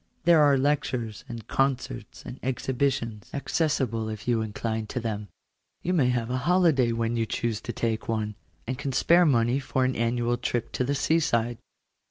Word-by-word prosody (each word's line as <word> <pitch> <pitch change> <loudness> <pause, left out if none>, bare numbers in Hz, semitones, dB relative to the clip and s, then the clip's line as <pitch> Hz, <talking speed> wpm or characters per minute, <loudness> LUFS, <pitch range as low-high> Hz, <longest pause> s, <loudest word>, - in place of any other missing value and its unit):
There 170 -2 +6
are 145 -2 +5
lectures, 130 -6 -1
and 115 -2 -7
concerts, 135 - -1
and 125 - -8
exhibitions, 130 -4 -1
accessible 130 -7 0
if 110 +1 -7
you 120 -2 +2
incline 110 0 -3
to 125 - -3
them. 105 -3 -3 0.6
You 180 - 0
may 140 -8 +3
have 120 -1 -1
a 130 - 0
holiday 160 -10 +4
when 115 0 -1
you 115 -1 0
choose 115 -1 -2
to - - -4
take 115 -2 -2
one, 110 -1 -1 0.3
and 130 +2 -4
can 140 -1 -3
spare 170 +6 +5
money 120 -1 +3
for 130 -1 0
an 130 - 0
annual 120 +1 0
trip 120 -1 -2
to - - -1
the 140 +3 0
sea 160 +4 +2
side. 120 -6 0
120 Hz, 180 wpm, -27 LUFS, 115-140 Hz, 0.6 s, There